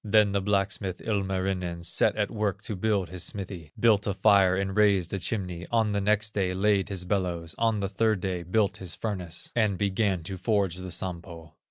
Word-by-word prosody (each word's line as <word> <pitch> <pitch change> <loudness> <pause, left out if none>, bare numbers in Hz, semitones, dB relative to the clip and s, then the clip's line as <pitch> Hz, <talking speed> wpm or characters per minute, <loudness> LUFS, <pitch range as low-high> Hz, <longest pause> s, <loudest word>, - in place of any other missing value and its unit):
There 105 0 +5
the 100 -1 -1
blacksmith, 100 -2 -1
Ilmarinen, 95 -4 -2
Set 85 - +3
at 105 -1 -1
work 105 -3 -2
to 105 - -3
build 100 -2 0
his 90 -1 -3
smithy, 90 -6 -5
Built 110 -3 +4
a 100 - -1
fire 100 -3 +5
and 95 0 -2
raised 100 -4 +3
a 100 - -1
chimney; 90 -3 -3
On 110 -2 +2
the 100 0 0
next 105 +1 +1
day 95 -2 0
laid 100 0 +2
his 95 -3 -2
bellows, 90 -4 -2
On 115 -2 +1
the 100 - 0
third 105 +1 +1
day 90 -1 -2
built 100 +3 0
his 90 -3 -5
furnace, 90 -6 -4
And 105 -5 +2
began 100 -2 0
to 95 +3 -5
forge 100 -3 0
the 95 0 -6
Sampo. 85 -2 -5
95 Hz, 195 wpm, -27 LUFS, 90-105 Hz, -, There